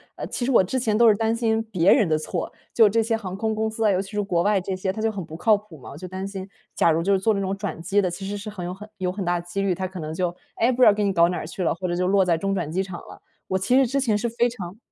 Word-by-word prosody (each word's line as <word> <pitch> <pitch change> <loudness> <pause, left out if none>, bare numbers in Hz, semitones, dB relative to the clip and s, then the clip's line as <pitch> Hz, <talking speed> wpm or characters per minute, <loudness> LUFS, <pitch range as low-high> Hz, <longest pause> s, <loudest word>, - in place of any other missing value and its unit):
呃 - - -5
其 245 - -3
实 270 - 0
我 235 - +6
之 260 +8 -2
前 220 -3 +1
都 235 0 +6
是 215 - +6
担 225 +2 0
心 225 -1 +1
别 180 -1 +4
人 215 -9 +3
的 155 -1 +2
错， 155 - -4 0.2
就 220 -3 +6
这 225 +2 +2
些 230 0 0
航 190 -4 -5
空 220 +2 -1
公 220 0 -1
司 220 0 -2
啊， 210 - +5
尤 185 -1 +1
其 195 - -10
是 210 -1 -1
国 175 -4 0
外 205 -1 +3
这 190 +1 -3
些 190 +1 -2
它 215 - -6
就 225 0 +1
很 200 -3 -5
不 155 - -10
靠 215 +6 +4
谱 205 -6 -14
嘛， 130 - -11
我 - - -10
就 185 +3 -7
担 190 +2 -5
心 195 -1 -7 0.3
假 165 - +4
如 160 +1 +1
就 200 - +2
是 195 - +3
坐 220 +3 +2
这 200 - -1
种 195 0 -1
转 190 -4 -5
机 195 +4 +2
的， 185 - 0
其 180 +3 -6
实 205 +1 -3
是 205 +1 -7
很 185 -4 -6
有 180 - -4
很 210 +3 -11
有 185 -1 -1
很 195 +1 -4
大 175 0 +1
的 170 - -10
几 175 +3 -3
率， 195 -2 +1
它 185 +1 -3
可 185 -1 -9
能 155 0 -5
就， 175 +1 -2 0.2
哎， 235 +3 +2
不 255 0 -2
知 - - +9
道 210 - +7
给 210 0 -1
你 200 - +1
搞 170 -1 +4
哪 175 -3 -3
去 175 +4 -5
了 - - +2
或 185 +1 -4
者 175 - -1
就 180 +1 0
落 195 0 +4
在 170 -2 +2
中 195 +4 -1
转 170 -5 -3
机 185 +3 0
场 185 -2 -7
了。 - - -13 0.3
我 190 - 0
其 220 +7 +1
实 270 - +5
之 275 +4 0
前 220 -5 +2
是 235 - -1
非 235 +1 +1
常 195 -5 -8
195 Hz, 380 characters per minute, -24 LUFS, 180-220 Hz, 0.3 s, 知